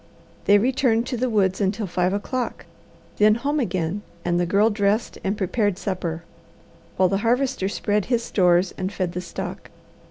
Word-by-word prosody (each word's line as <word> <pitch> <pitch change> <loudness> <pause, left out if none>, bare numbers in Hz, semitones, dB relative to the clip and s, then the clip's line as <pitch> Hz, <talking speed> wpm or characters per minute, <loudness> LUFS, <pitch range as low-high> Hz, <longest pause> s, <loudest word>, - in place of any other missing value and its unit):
They 205 - +6
returned 240 0 +2
to 250 - -3
the 255 +2 0
woods 195 -3 +1
until 200 +2 0
five 180 0 0
o'clock; 240 +5 -3 0.5
then 210 0 +5
home 285 +6 -1
again 185 - -1 0.2
and 175 0 +1
the 175 - +1
Girl 205 +5 +3
dressed 205 +2 0
and 195 +2 -1
prepared 205 0 0
supper, 175 -4 -3 0.7
while 185 - +4
the 195 - 0
Harvester 245 -2 +1
spread 205 0 0
his 240 -2 0
stores 180 -2 +2
and 185 +1 -2
fed 185 -4 -2
the 180 - -4
stock. 180 - -7
205 Hz, 165 wpm, -23 LUFS, 185-230 Hz, 0.7 s, They